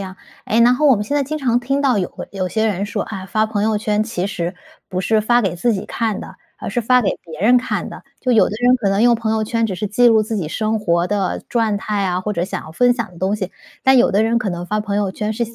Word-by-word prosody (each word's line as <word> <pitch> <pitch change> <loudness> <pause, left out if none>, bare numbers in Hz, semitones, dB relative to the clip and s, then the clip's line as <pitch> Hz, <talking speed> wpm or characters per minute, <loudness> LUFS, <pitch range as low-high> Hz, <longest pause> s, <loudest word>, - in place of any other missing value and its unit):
样。 190 -1 -7 0.3
诶， 225 +2 +2
然 245 +2 +6
后 300 +3 +2
我 265 - +6
们 210 - -3
现 290 +6 -1
在 285 - +2
经 310 +3 -4
常 245 -4 +1
听 275 +3 -1
到 255 -7 +2
有 180 - -1
会 - - -9
有 185 -2 -2
些 220 +2 0
人 200 -2 -1
说： 205 - -2
“啊， 195 -3 -7
发 215 +3 +1
朋 210 -2 -2
友 220 -1 +1
圈 210 0 0
其 215 -5 -3
实 180 -2 -3 0.3
不 185 - -2
是 215 +4 +2
发 240 +3 +3
给 185 -3 -1
自 230 +7 +1
己 190 - -4
看 225 -3 -2
的， - - -10 0.2
而 - - -6
是 240 - 0
发 250 +3 +4
给 195 - +1
别 160 -2 -10
人 240 +5 +5
看 245 - -1
的。” - - -10 0.2
就 255 - +1
有 225 - +5
的 - - -7
人 250 +1 +5
可 225 -5 -1
能 195 +2 +1
用 240 0 +5
朋 225 -1 -2
友 220 0 0
圈 230 +1 0
只 200 -4 -2
是 210 +4 -2
记 240 +4 +4
录 220 -2 +4
自 220 +1 -3
己 165 -6 -3
生 215 +3 -1
活 170 -2 +1
的 200 -2 -1
状态 215 -3 0
啊， 180 -1 0
或 210 +3 -3
者 175 -3 -1
想 190 -1 -5
要 160 - -11
分 245 +6 +3
享 230 -6 -4
的 170 - -14
东 195 +3 0
西。 190 -2 -5 0.3
但 265 0 +6
有 250 - +5
的 205 +3 +2
人 230 +1 +2
可 230 -5 -2
能 175 0 -5
发 210 +2 -1
朋 205 -1 -3
友 200 -2 0
圈 210 +2 -3
是 235 +2 -1
想 230 0 -12
215 Hz, 325 characters per minute, -19 LUFS, 195-235 Hz, 0.3 s, 然